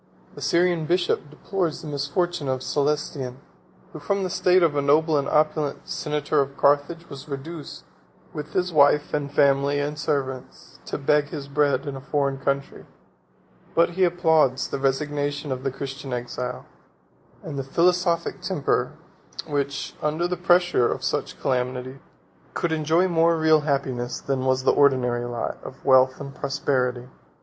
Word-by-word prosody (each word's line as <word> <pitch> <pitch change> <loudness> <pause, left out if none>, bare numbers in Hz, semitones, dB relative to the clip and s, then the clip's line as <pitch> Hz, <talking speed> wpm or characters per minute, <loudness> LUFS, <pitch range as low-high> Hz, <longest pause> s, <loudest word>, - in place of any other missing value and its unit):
42 - - -24
The - - -8
Syrian 170 -2 +2
bishop 175 +1 +1
deplores 170 +1 -3
the - - -7
misfortunes 145 +2 -1
of 130 -1 -1
Cælestian, 145 -3 -1 0.6
who, 155 - -7
from 195 +5 -1
the 185 - -2
state 180 0 +3
of 160 -3 +2
a 145 - +2
noble 155 +3 +3
and 140 -1 0
opulent 155 0 0
senator 150 -4 0
of 140 0 -4
Carthage, 145 +4 +2
was 140 +2 -10
reduced, 145 +3 -7 0.5
with 150 -1 -7
his 180 -1 0
wife 145 0 +4
and 145 -1 -2
family, 140 0 +3
and 145 +1 -3
servants, 135 -4 -4
to - - -4
beg 145 +1 +2
his 145 -1 -7
bread 140 -2 +1
in 140 -1 -4
a 135 - -7
foreign 140 -1 -1
country; 140 0 -3 0.9
but 170 +1 +4
he 185 +2 0
applauds 160 -7 +3
the - - -3
resignation 145 +1 -1
of 130 -1 -3
the 135 - 0
Christian 135 0 -7
exile, 125 0 -4 0.8
and 145 -4 -5
the - - -2
philosophic 170 +4 +1
temper, - - 0 0.5
which, 140 -1 -2
under 155 +3 0
the 180 - -2
pressure 175 -6 +3
of - - -4
such - - -2
calamities, 125 +1 -2 0.6
could 170 - -1
enjoy 160 +3 +2
more 165 -1 +3
real 160 -1 +4
happiness 135 -4 -2
than 135 -1 -2
was 130 0 +1
the - - +4
ordinary 125 -4 +2
lot 120 -1 -4
of 130 - -11
wealth 130 -1 +5
and 140 0 -7
prosperity. 130 -3 -1
145 Hz, 155 wpm, -24 LUFS, 135-160 Hz, 0.9 s, wealth